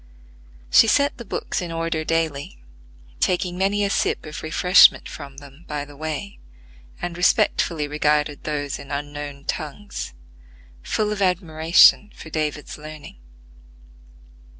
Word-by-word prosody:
She - - +7
set 285 +5 +2
the - - -6
books - - -3
in 175 -2 -5
order 165 -1 -2
daily, 155 - -2 0.6
taking 180 - 0
many 200 +2 +1
a 200 - +1
sip - - 0
of 150 0 -7
refreshment 180 +4 +5
from 140 -2 -10
them 140 +3 -14
by 145 -1 -4
the 145 0 -14
way, 155 +6 -5 0.6
and 175 -1 -4
respectfully 170 -3 +2
regarded 150 0 0
those 145 -2 -3
in 140 - -11
unknown 145 -1 -6
tongues, 155 - -5 0.7
full 210 - -1
of 210 -1 -3
admiration 175 +2 +4
for 160 - -11
David's 150 -1 -3
learning. 155 - -10
155 Hz, 125 wpm, -22 LUFS, 145-180 Hz, 0.7 s, She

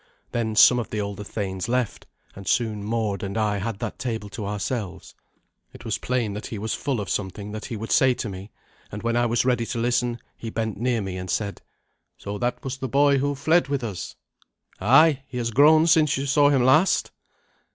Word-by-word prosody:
Then 110 -2 -1
some 110 +4 +7
of 120 - -4
the 105 - -3
older 100 0 -4
thanes 95 -1 -4
left, 125 -3 -1 0.3
and 95 -1 -10
soon 110 -4 0
Mord 110 -2 -1
and 100 0 -4
I 105 -2 +1
had 105 +1 -3
that 115 0 -5
table 110 -5 -4
to 100 0 -6
ourselves. 105 -1 -4 0.6
It - - -13
was 110 - -2
plain 120 -5 -1
that 105 - -6
he 110 - -6
was 110 +2 -3
full 135 -5 -2
of 100 - -4
something 100 +1 -3
that 110 0 -6
he 115 - -5
would 110 +2 -6
say 130 -1 +4
to - - -4
me, 95 0 -8 0.4
and 105 - -7
when 115 0 0
I 120 0 +2
was 120 +1 +1
ready 125 -2 +2
to 120 - -4
listen 120 0 0 0.2
he 115 - -7
bent 110 -2 -3
near 120 -1 0
me 95 -1 -5
and 90 0 -6
said, 100 +2 -2 0.6
"So 100 0 -6
that 120 0 -2
was 135 0 -4
the 130 - -4
boy 140 +1 +4
who 145 +1 0
fled 160 +4 +2
with 140 -2 -2
us." 95 -5 -5 0.6
"Ay. 135 +7 +5
He 130 - -7
has 115 -1 -1
grown 155 +6 +6
since 155 -4 +4
you 135 - -2
saw 145 +1 +4
him 135 -4 +3
last." 155 +9 +3
115 Hz, 215 wpm, -24 LUFS, 105-130 Hz, 0.6 s, some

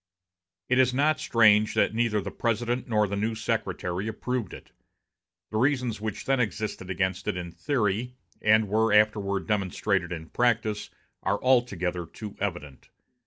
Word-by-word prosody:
It 125 +1 +2
is 125 -1 +3
not 150 +2 +2
strange 110 -2 +4
that - - +2
neither 115 -2 +1
the - - -6
President 120 +2 -1
nor 105 -3 +2
the 100 - -3
new 110 +3 -1
Secretary 90 -2 -2
approved 115 -1 -3
it. - - -12 0.8
The 110 - -1
reasons 125 -4 +1
which 110 -2 -4
then 135 -1 +2
existed 110 -5 -3
against 95 0 -1
it - - -1
in 85 -1 -5
theory, 125 - -1 0.3
and 110 0 +4
were 110 +3 +2
afterward 105 -2 +2
demonstrated 95 -3 0
in 80 -2 -6
practice, 110 -3 0 0.3
are 100 - 0
altogether 100 -9 +1
too 105 +5 -9
evident. 85 -9 -5
105 Hz, 150 wpm, -27 LUFS, 100-120 Hz, 0.8 s, strange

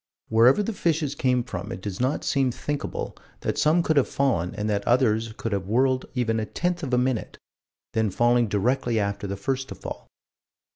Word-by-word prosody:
Wherever 120 - +5
the 225 - -2
fishes 160 -6 0
came 125 -3 +1
from 105 -3 -6
it - - -5
does 95 -1 -5
not 130 +4 0
seem 135 -3 +2
thinkable 145 +4 -4 0.3
that - - -1
some 160 +3 +4
could 160 -2 +1
have 140 - +4
fallen 110 -10 0
and 105 0 -2
that 100 -1 0
others 115 -3 +2
could 115 - -3
have 100 -2 -2
whirled 130 +4 +2
even 115 -3 +1
a 110 - -1
tenth 175 +6 -1
of 140 -5 -4
a 125 - +3
minute, 125 -2 -1 0.6
then 110 -1 +1
falling 120 +3 +3
directly 115 +3 +1
after 100 0 -2
the 100 0 -4
first 130 +6 -2
to - - -6
fall. - - -8
120 Hz, 195 wpm, -25 LUFS, 105-135 Hz, 0.6 s, Wherever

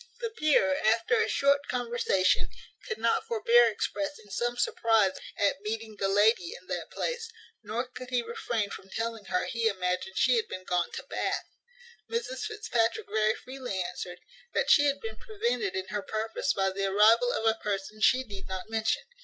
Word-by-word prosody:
The 465 -2 -3
peer, 305 - +3
after 230 - +3
a 455 - +1
short 280 0 +2
conversation, 235 -6 +1 0.4
could 465 - -3
not - - +1
forbear 475 +1 +5
expressing 290 -9 -3
some 240 +5 -1
surprize 225 -5 +2 0.2
at 200 -1 +1
meeting 220 +1 -4
the 195 - +1
lady 205 -2 +3
in - - -23
that - - -3
place; 475 -2 -3 0.3
nor 225 +4 -3
could 250 0 -9
he 250 -1 +1
refrain 230 -2 -2
from 195 - -9
telling 225 0 -3
her 180 - 0
he 230 -1 0
imagined 185 -1 -1
she 255 -2 +4
had 225 - 0
been 185 - -6
gone 180 -1 0
to - - -5
Bath. - - -2 0.6
Mrs 465 -1 -3
Fitzpatrick 240 - 0
very 215 0 +2
freely 255 -6 -6
answered, 180 0 -4 0.4
"That - - +2
she 290 - +7
had 280 0 +1
been 220 -1 -6
prevented 435 - -2
in 190 0 -3
her 205 +1 -2
purpose 220 +2 -2
by 195 -1 +1
the 195 +1 -2
arrival 220 +5 +5
of 225 - -2
a 225 0 +2
person 205 +1 -3
she 255 +3 +5
need 200 -5 -9
not 190 +3 -6
mention. 225 0 0
225 Hz, 180 wpm, -29 LUFS, 200-260 Hz, 0.6 s, she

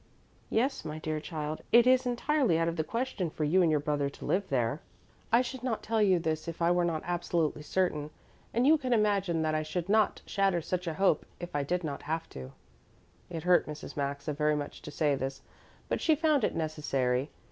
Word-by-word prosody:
"Yes, 260 +5 0
my 155 0 -5
dear 155 0 -3
child. 155 -1 -5
It 235 0 +7
is 255 0 +4
entirely 245 - +2
out 165 0 +1
of 165 - -1
the 160 - 0
question 210 0 -2
for 155 - -4
you 170 +6 +4
and 170 - +4
your 155 -1 +3
brother 145 -1 0
to - - -11
live 195 +1 0
there. 130 +2 0 0.5
I 235 +2 +5
should 260 0 -6
not 245 -3 -2
tell 225 0 +1
you 190 -3 +5
this 160 -1 -2
if 165 - -5
I 170 0 +3
were 175 0 +3
not 165 -2 -1
absolutely 170 -3 -1
certain, 150 -2 -1 0.4
and 240 +3 +1
you 310 +2 +6
can 255 -3 0
imagine 200 -7 +2
that 155 0 0
I 155 - +1
should 170 +4 -4
not 215 0 +2
shatter 195 -3 +1
such 180 +2 -3
a 160 - -2
hope 190 -4 +2
if 175 -3 -7
I 145 - +2
did 175 +5 -1
not 145 -3 -4
have 160 +2 -3
to." 65 0 -9 0.8
It 165 -3 -5
hurt 180 0 +4
Mrs. 150 0 -7
Maxa 140 +1 -2
very 150 +1 +1
much 145 -1 -5
to - - -8
say 150 0 +1
this, 135 0 -4 0.4
but - - -1
she 315 - +4
found 305 -4 +2
it - - 0
necessary. 140 -4 -1
165 Hz, 215 wpm, -30 LUFS, 150-205 Hz, 0.8 s, It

